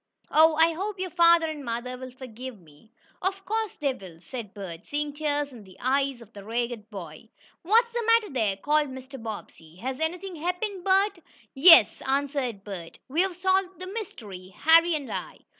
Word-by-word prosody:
Oh, 315 +1 +6
I 325 +1 +4
hope 395 +4 -4
your 370 -1 -3
father 335 0 +5
and 310 -2 -5
mother 240 +1 -4
will 255 0 -8
forgive 255 -2 -9
me." 160 +5 -21 0.3
"Of 390 +1 -2
course 440 0 -2
they 280 -3 0
will," 185 -8 -12
said 225 +1 -7
Bert, 185 -3 -8
seeing 295 0 -2
tears 290 -1 -1
in 235 -4 -12
the 190 -1 -16
eyes 270 0 0
of 225 -1 -15
the 200 - -10
ragged 230 0 -3
boy. 185 -1 -9 0.3
"What's 460 +6 +3
the 475 - 0
matter 460 -4 +4
there?" 215 -6 0
called 295 +6 +1
Mr. 260 0 -9
Bobbsey. 200 -7 -8
"Has 255 +7 -5
anything 350 +3 -3
happened, 360 +4 -3
Bert?" 390 0 +2 0.3
"Yes," 305 - +7
answered 270 -6 -1
Bert. 185 -5 -8
"We've 350 +6 +1
solved 375 0 +1
the 370 - -6
mystery 225 - -7
Harry 325 - +4
and 285 -3 -5
I." - - -6
280 Hz, 175 wpm, -26 LUFS, 225-350 Hz, 0.3 s, Yes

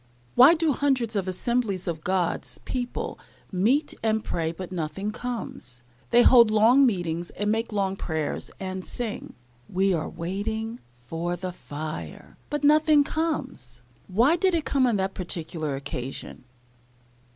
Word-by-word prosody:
Why 280 +7 +8
do 325 -2 +2
hundreds 255 -5 0
of 195 -2 -1
assemblies 200 0 -1
of 160 -2 -3
God's 180 -2 -1
people 245 -1 -4 0.3
meet 235 +11 +2
and 220 -1 +1
pray, 165 -1 -1
but 180 +2 -8
nothing 180 +4 -3
comes? 215 - -6 0.3
They 240 - +6
hold 235 -3 +7
long 230 +6 +6
meetings, 175 -5 -2
and 205 +1 -1
make 225 +1 -1
long 195 -2 0
prayers, 160 -5 -3
and 185 -1 -4
sing, 230 +1 -5 0.3
"We 190 +1 +2
are 160 -2 -1
waiting 220 +7 -4 0.2
for 165 +8 -3
the 185 +1 -5
fire;" 155 -2 -7
but 295 0 -2
nothing 305 0 +5
comes! 280 - -3 0.2
Why 235 - +4
did 365 0 +2
it 320 -4 -1
come 265 -2 +2
on 235 - +2
that 190 -1 -1
particular 160 -4 -3
occasion? 135 -2 -6
195 Hz, 140 wpm, -26 LUFS, 170-245 Hz, 0.3 s, Why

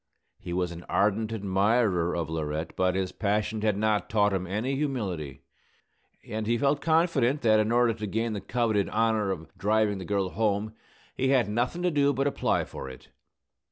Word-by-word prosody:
He 90 - -8
was 90 0 -1
an 85 0 -8
ardent 105 +2 +1
admirer 100 -3 +1
of 85 -2 -2
Laurette; 80 0 -3
but 95 0 +1
his 95 -1 -1
passion 105 +1 -1
had 105 -2 +1
not 105 0 0
taught 105 -1 +2
him 95 -1 -2
any 110 +9 -1
humility, 100 - -3 0.8
and 110 0 -4
he 120 +1 +2
felt 140 +2 +1
confident 160 -5 +2
that 110 -2 +5
in 110 +1 +1
order 120 -1 +3
to 105 -1 -5
gain 110 +3 -1
the 100 - -4
coveted 110 -1 0
honor 110 -2 +1
of 80 -4 -5
driving 105 -1 +1
the 95 - -6
girl 100 -1 0
home 110 0 0 0.4
he 130 - 0
had 130 -4 +3
nothing 120 +11 -1
to 180 - +2
do 145 -2 +3
but 135 +1 0
apply 140 - +1
for 65 - -8
it. 65 - -13
105 Hz, 185 wpm, -27 LUFS, 95-120 Hz, 0.8 s, that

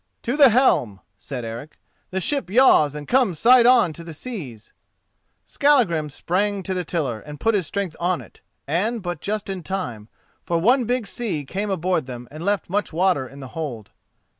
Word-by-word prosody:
"To 245 - -1
the 285 -3 +7
helm," 150 - +2 0.2
said 125 -5 -6
Eric; 115 +7 -8 0.3
"the 190 - -2
ship 275 - 0
yaws 190 - +5
and 150 -1 -7
comes 240 -10 +2
side 240 +6 +6
on 245 -10 +5
to 170 - -10
the 165 -1 -9
seas." 145 - -8 0.7
Skallagrim 225 - +2
sprang 190 +7 -1
to 190 - -2
the 180 -1 -2
tiller 145 -9 -2
and 150 +4 -10
put 225 +5 +2
his 190 -6 0
strength 200 -5 -3
on 175 0 0
it, - - -15 0.2
and 200 +9 -1
but 175 -4 -4
just 210 0 -3
in 190 -2 -4
time, 125 - -5 0.3
for 170 - -1
one 240 +9 +3
big 245 0 -1
sea 200 -11 -2
came 200 +8 -3
aboard 180 -5 -1
them 125 -1 -8
and 155 +3 -8
left 200 -1 0
much 205 +3 -1
water 170 -5 +1
in 140 +3 -12
the 130 - -8
hold. 130 -10 -6
180 Hz, 190 wpm, -22 LUFS, 150-210 Hz, 0.7 s, the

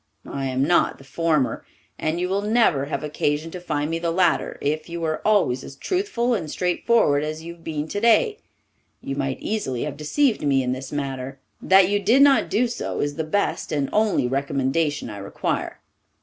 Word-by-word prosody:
I 135 -1 -3
am 130 0 0
not 175 +4 +2
the - - -15
former, 150 -1 0 0.4
and 160 +2 -1
you 180 - 0
will 195 +2 0
never 210 - +2
have 140 0 -4
occasion 150 +1 -1
to 180 - -6
find 150 -3 -2
me 165 - -1
the 170 0 -1
latter 175 0 +1
if 155 +4 -2
you 170 0 -5
are 155 -1 -1
always 195 -12 +2
as 135 - -10
truthful 250 - -1
and 175 -9 -2
straightforward 180 -3 +2
as 155 +1 -4
you 170 +1 -7
have 170 -1 -20
been 155 -1 -3
today. 235 - +2 0.6
You 135 - -4
might 135 -1 -2
easily 170 - -2
have 145 -1 -5
deceived 230 - +1
me 135 -2 +2
in 125 - -1
this 130 +1 -5
matter. 135 -2 -4 0.2
That 190 -1 +6
you 205 +1 +1
did 230 +8 +5
not 280 -1 +4
do 245 +3 +2
so 235 - -4
is 145 0 -1
the 160 - -3
best 200 +6 -1
and 140 -3 -1
only 210 - +2
recommendation 140 +3 -1
I 105 -3 -7
require. 100 - -3
155 Hz, 190 wpm, -23 LUFS, 140-200 Hz, 0.6 s, That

